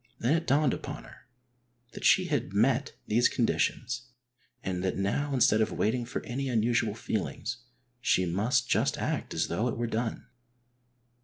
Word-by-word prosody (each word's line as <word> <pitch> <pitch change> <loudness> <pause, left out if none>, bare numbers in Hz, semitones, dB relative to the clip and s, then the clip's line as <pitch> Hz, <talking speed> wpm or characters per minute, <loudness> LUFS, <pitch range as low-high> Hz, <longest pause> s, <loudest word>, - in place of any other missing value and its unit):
Then 120 +6 +1
it 165 0 -2
dawned 145 -1 +3
upon - - -6
her 85 - -16 0.6
that - - -9
she 185 - +5
had 145 - -1
met 125 +6 +2
these 120 +3 +3
conditions 125 +1 0 0.6
and 90 -1 -2
that 95 - -1
now 105 +9 0
instead 120 -4 +4
of 110 - +1
waiting 120 +3 0
for 125 - -5
any 135 +3 -3
unusual 115 -2 +1
feelings 105 -5 -3 0.4
she 95 -6 +2
must 110 +8 +1
just - - +1
act - - -2
as - - +1
though 105 +8 -1
it 120 - -2
were 120 - -1
done. 115 0 -2
120 Hz, 160 wpm, -29 LUFS, 105-125 Hz, 0.6 s, she